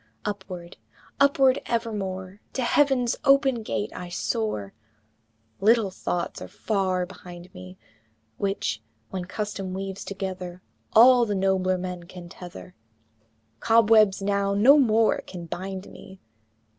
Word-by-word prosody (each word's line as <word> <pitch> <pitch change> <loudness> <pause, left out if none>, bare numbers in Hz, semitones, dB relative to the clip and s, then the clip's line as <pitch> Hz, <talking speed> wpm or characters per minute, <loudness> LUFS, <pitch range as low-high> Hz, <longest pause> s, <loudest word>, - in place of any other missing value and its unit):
II. 110 0 -38
Upward! 185 -3 -10 0.4
upward 275 -1 +4
evermore, 200 -4 -3
To 260 - -1
Heaven's 255 -2 +2
open 275 -3 +4
gate 210 -1 -3
I 180 -1 -7
soar! 180 - -2 0.9
Little 220 -1 +3
thoughts 175 -1 -3
are - - -6
far 190 -4 -1
behind 180 -1 -12
me, 90 0 -11 0.6
Which, 195 - -2 0.3
when 185 -2 -4
custom 195 -1 -4
weaves 195 0 -5
together, 185 -2 -6 0.3
All 245 +1 +7
the 205 - -1
nobler 190 -1 +1
man 180 -1 -6
can 175 0 -11
tether 95 - -11 0.9
Cobwebs 220 -3 +4
now 200 0 0
no 265 +9 +7
more 225 -4 +3
can 175 -2 -8
bind 190 +3 -6
me! 190 0 -13
195 Hz, 120 wpm, -25 LUFS, 180-225 Hz, 0.9 s, All